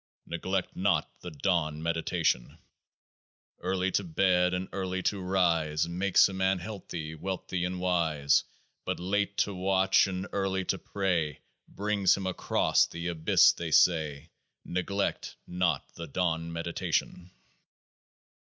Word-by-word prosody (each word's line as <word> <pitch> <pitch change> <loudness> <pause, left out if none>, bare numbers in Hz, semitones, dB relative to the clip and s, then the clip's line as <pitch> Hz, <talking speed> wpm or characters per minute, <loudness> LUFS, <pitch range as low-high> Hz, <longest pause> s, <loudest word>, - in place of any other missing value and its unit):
Neglect 90 +2 -3
not - - +1
the 90 - -6
dawn 80 -1 0
meditation! 80 -7 0 1.0
Early 95 +1 -1
to 100 - +1
bed 90 +1 +2
and 90 +1 -3
early 95 -1 -3
to 100 -2 0
rise 85 -4 +1
Makes 90 +3 +4
a 100 - -7
man 95 0 +1
healthy 85 -5 -6
and 80 - -11
wealthy 95 -2 -3
and 90 0 -3
wise: 80 -6 +2 0.4
But - - -3
late 100 +2 -1
to 100 - -6
watch 95 +1 +3
and 95 0 -4
early 95 -1 -1
to - - -1
pray 90 -7 -1 0.3
Brings 100 -2 +1
him 95 - -5
across 95 - +2
The 85 +1 -5
Abyss, 80 -2 +5
they 85 -1 -5
say. 80 -2 +2 0.3
Neglect 100 +2 -2
not 90 0 -1
the 85 - -7
dawn 85 +1 -1
meditation 85 +1 -2
90 Hz, 130 wpm, -29 LUFS, 85-95 Hz, 1.0 s, Abyss